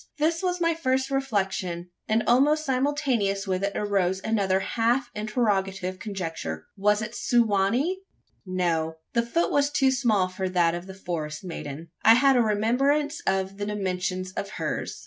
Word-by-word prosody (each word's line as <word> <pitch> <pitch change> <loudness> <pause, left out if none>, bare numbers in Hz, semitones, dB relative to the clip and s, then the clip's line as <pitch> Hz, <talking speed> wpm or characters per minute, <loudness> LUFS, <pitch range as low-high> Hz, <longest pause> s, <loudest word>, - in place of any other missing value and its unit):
This 325 +2 +1
was 360 -1 -1
my 335 -1 +2
first 265 -4 0
reflection; 195 -9 -1 0.2
and 220 +1 +2
almost 295 +6 +3
simultaneous 255 -7 0
with 190 -1 -1
it 200 0 0
arose 195 -3 +1
another 195 -4 +1
half 240 +4 0
interrogative 195 -4 -1
conjecture: 165 - -5
was 210 +2 +2
it 215 +1 -6
Su 240 0 +3
wa 200 -3 +2
nee? 305 - 0 0.4
No. 170 -4 -1 0.2
The 235 - +3
foot 235 +9 0
was 285 0 +3
too 270 -2 +3
small 225 -8 +2
for 185 0 -3
that 175 -2 +2
of 175 +2 -5
the 190 - -9
forest 160 -5 -5
maiden. 165 -2 -7
I 225 - +7
had 270 +2 +5
a 245 - +5
remembrance 270 +8 +1
of 190 0 0
the 205 - -3
dimensions 185 -2 -2
of 200 +1 -4
hers. - - -3
210 Hz, 165 wpm, -26 LUFS, 185-260 Hz, 0.4 s, I